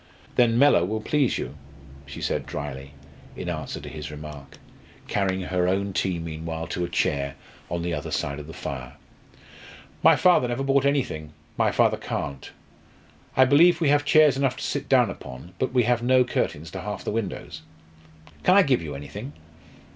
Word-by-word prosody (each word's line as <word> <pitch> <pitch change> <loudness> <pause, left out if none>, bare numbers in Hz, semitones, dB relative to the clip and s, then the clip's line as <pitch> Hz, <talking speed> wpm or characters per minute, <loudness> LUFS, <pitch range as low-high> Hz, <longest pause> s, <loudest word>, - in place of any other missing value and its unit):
"Then 120 -2 +4
Mellor 140 -9 +5
will 110 +5 -1
please 140 +3 +1
you," - - -5 0.5
she 70 - -8
said - - -2
drily, 70 0 -6 0.4
in - - -5
answer - - -4
to - - -10
his 75 -1 -7
remark, 75 -2 -10 0.5
carrying 95 -2 0
her 90 0 0
own 100 +1 0
tea 95 -1 0
meanwhile 80 0 -5
to 90 - -2
a 85 - -3
chair 70 -4 0 0.3
on 85 0 -2
the 85 0 -2
other 75 -2 -4
side 70 0 -2
of 75 - -9
the - - -8
fire. 65 -1 -6 1.1
"My - - +7
father 180 -9 +4
never 120 +3 -2
bought 135 0 +2
anything 80 - -1 0.2
my - - +2
father - - +3
can't. 70 -1 -5 0.9
I 130 - +7
believe 160 +7 +5
we 160 -4 +2
have 145 0 +4
chairs 150 -1 +5
enough 135 -2 0
to - - -6
sit - - -3
down - - +4
upon 65 +8 -10
but 130 - 0
we 125 -1 +3
have 120 0 +2
no 130 +1 +4
curtains 85 -9 -2
to 95 - -6
half 105 +1 -5
the - - -2
windows. 105 -3 -4 0.8
Can 185 - +4
I 200 - +8
give 135 -6 +2
you 75 -3 -6
anything?" 70 0 -8
95 Hz, 180 wpm, -25 LUFS, -, 1.1 s, I